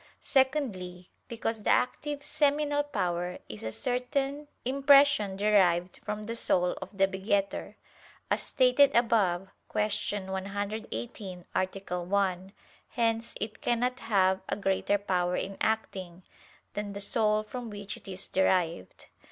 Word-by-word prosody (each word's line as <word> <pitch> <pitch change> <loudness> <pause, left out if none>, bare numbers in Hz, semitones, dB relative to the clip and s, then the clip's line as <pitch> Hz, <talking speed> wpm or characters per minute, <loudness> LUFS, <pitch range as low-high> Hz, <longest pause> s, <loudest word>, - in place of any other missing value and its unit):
Secondly, 215 -11 0 0.2
because 225 -1 -3
the - - -1
active 290 +3 +1
seminal 290 0 +2
power 180 -10 -2
is 105 - -9
a 110 - -4
certain 270 - -2 0.2
impression 275 -5 +5
derived 185 -4 +3
from 210 0 -4
the 230 +2 -4
soul 180 -5 +2
of 200 - -9
the 195 0 +5
begetter, 195 +1 -1 0.6
as - - +2
stated 265 +2 +4
above 195 -6 +2 0.2
(Q. 205 -1 0
118, 200 0 -5
A. 185 -1 -2
1). 190 0 0 0.4
Hence 230 -1 -1
it 215 0 -5
cannot 245 +2 0
have 190 -3 +2
a - - 0
greater 200 0 +1
power 180 -3 0
in 195 +1 -3
acting, 190 -5 -2 0.5
than 205 -1 -4
the 200 - -5
soul 215 +1 +3
from 240 +2 -6
which 205 -1 -5
it - - -14
is 190 0 -4
derived. 175 - 0
205 Hz, 125 wpm, -29 LUFS, 190-240 Hz, 0.6 s, impression